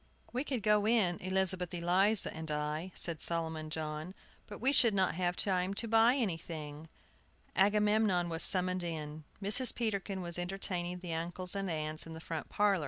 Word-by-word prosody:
"We 255 +3 -1
could 260 -7 -3
go 210 0 +3
in, 205 -7 +2
Elizabeth 185 -1 0
Eliza 185 +5 +2
and 160 0 -7
I," 150 +4 -3
said 165 -3 -2
Solomon 160 -2 -3
John, 155 +3 -5 0.3
"but 205 - -8
we 260 +4 +1
should 235 -6 +4
not 190 -4 +2
have 175 +1 -1
time 185 0 0
to 230 +3 -1
buy 225 +3 +4
anything." 160 - -4 0.7
Agamemnon 210 -2 +2
was 165 0 -3
summoned 185 0 +2
in. 155 -3 -6 0.2
Mrs. 215 +6 +6
Peterkin 200 -4 -3
was 170 0 -1
entertaining 180 -1 -3
the 175 -3 -4
uncles 175 +2 +1
and 195 -1 -2
aunts 155 0 -3
in 165 - -8
the - - -8
front 160 0 -6
parlor. 205 -2 +2
180 Hz, 170 wpm, -32 LUFS, 165-205 Hz, 0.7 s, Mrs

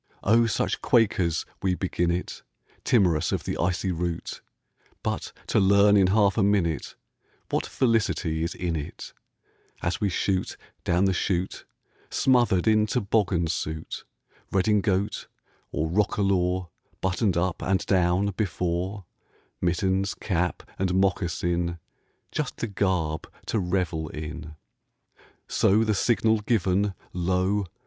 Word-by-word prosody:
Oh, 115 +3 +4
such 110 - -1
quakers 95 -8 +2 0.2
we 95 -1 +1
begin 90 -2 -1
it, 85 +1 -3 0.4
Timorous 85 -8 +3
of - - -1
the - - -3
icy 90 +2 0
route! 85 -1 -3 0.6
But - - -2
to - - +2
learn 100 +1 +5
in 95 -2 +5
half 100 +1 +3
a - - +4
minute 95 -6 +1 0.6
What - - 0
felicity 110 -9 +1
is 85 - -3
in 85 -2 -2
it, 75 -2 -6 0.7
As 85 - -1
we 100 - +2
shoot 95 +1 -1 0.3
down 90 +3 +2
the 95 - +2
chute, 90 0 -1 0.4
Smothered 120 -8 +3
in 110 -1 +4
toboggan 100 -5 +1
suit, 80 -1 -4 0.5
Redingote 100 0 +1 0.4
or 80 - -1
roquelaure, 95 -1 +1 0.3
Buttoned 95 0 0
up 90 0 -1
(and 95 0 0
down) 90 0 +2
before, 90 0 -2 0.6
Mittens, 95 +2 +1
cap, 90 -3 -1 0.2
and 95 -1 +1
moccasin, 85 -2 0 0.5
Just 150 -4 -3
the - - -2
garb 90 -6 -1
to 110 - 0
revel 90 -4 -1
in; 75 0 -7 0.9
So, 105 +3 +3
the 110 -1 +1
signal 110 +1 +2
given, 100 -2 +1 0.2
lo! 95 +3 +1
95 Hz, 120 wpm, -26 LUFS, 85-100 Hz, 0.9 s, learn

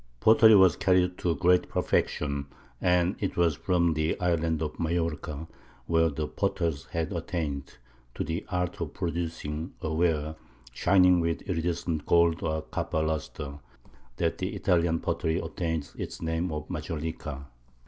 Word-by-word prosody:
Pottery 110 - +7
was 95 -4 +6
carried 90 -1 +2
to 85 -2 +1
great 90 -1 +3
perfection, 70 -1 0 0.3
and 90 +1 +3
it 100 - -2
was 85 -3 +3
from 85 +4 +1
the 80 +1 -1
island 85 -2 +1
of 75 - -5
Majorca, 80 -2 -2 0.4
where 80 0 +3
the 75 +1 -3
potters 85 -7 -1
had 80 +1 -3
attained 75 -6 -4 0.4
to - - -2
the 80 +5 -3
art 90 -3 -2
of - - -4
producing 80 -1 -3
a 80 - -3
ware 80 -2 0 0.4
shining 90 +3 +5
with 85 -1 -1
iridescent 85 -3 -2
gold 85 -1 +4
or 80 0 -1
copper 80 0 -2
lustre, 75 -2 -4 0.6
that - - 0
the - - -2
Italian 85 -2 +2
pottery 80 -1 0
obtained 80 -3 -3
its - - -6
name 80 +2 -1
of 75 0 -4
Majolica. 75 -3 -5
80 Hz, 140 wpm, -28 LUFS, 80-90 Hz, 0.6 s, Pottery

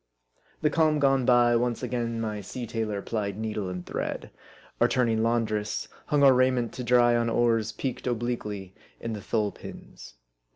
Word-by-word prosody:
The 150 - +3
calm 155 -1 +3
gone 135 -3 +3
by, 120 -1 +5
once 120 0 0
again 115 -2 -2
my 105 -2 -3
sea 120 +5 -6
tailor 110 -3 -3
plied 105 -3 -3
needle 110 -3 -3
and 90 -1 -6
thread; - - -4 0.5
or - - +5
turning 115 -3 +1
laundress, 110 -2 0 0.2
hung 145 -2 +2
our 135 -1 +8
raiment 125 -2 +2
to 125 - -5
dry 120 0 +4
on 115 0 +1
oars 115 -2 +2
peaked 130 +2 -4
obliquely 110 -5 -3 0.3
in 115 - -4
the 105 - -5
thole 105 0 0
pins. - - -12
115 Hz, 165 wpm, -27 LUFS, 110-125 Hz, 0.5 s, our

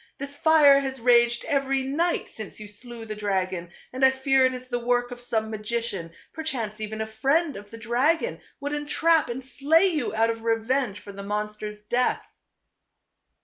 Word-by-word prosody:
This 280 +1 -6
fire 290 -2 +6
has 265 -1 -4
raged 240 0 +4
every 275 -2 +1
night 325 +6 0
since 215 -1 -9
you 210 - -8
slew 230 +2 -9
the 215 -1 -5
dragon, 185 -4 -2 0.2
and 260 +1 -2
I 265 - +9
fear 265 0 +3
it 255 - -3
is 255 0 -8
the 245 -1 -2
work 245 0 0
of 245 0 -8
some 220 -2 -1
magician 215 -4 -3
•, - - -23 0.2
perchance 235 -9 -3
even 215 0 -4
a - - -1
friend 275 +8 +1
of 205 +1 -10
the 230 - -10
dragon 265 - 0 0.2
would 285 +1 -3
entrap 305 +1 +2
and 250 +2 -5
slay 295 +7 +3
you 290 - -1
out 225 +1 +3
of 225 0 -7
revenge 230 -1 0
for 200 - -10
the 200 0 -8
monster's 210 +1 -4
death." 240 +4 0
245 Hz, 185 wpm, -25 LUFS, 215-275 Hz, 0.2 s, I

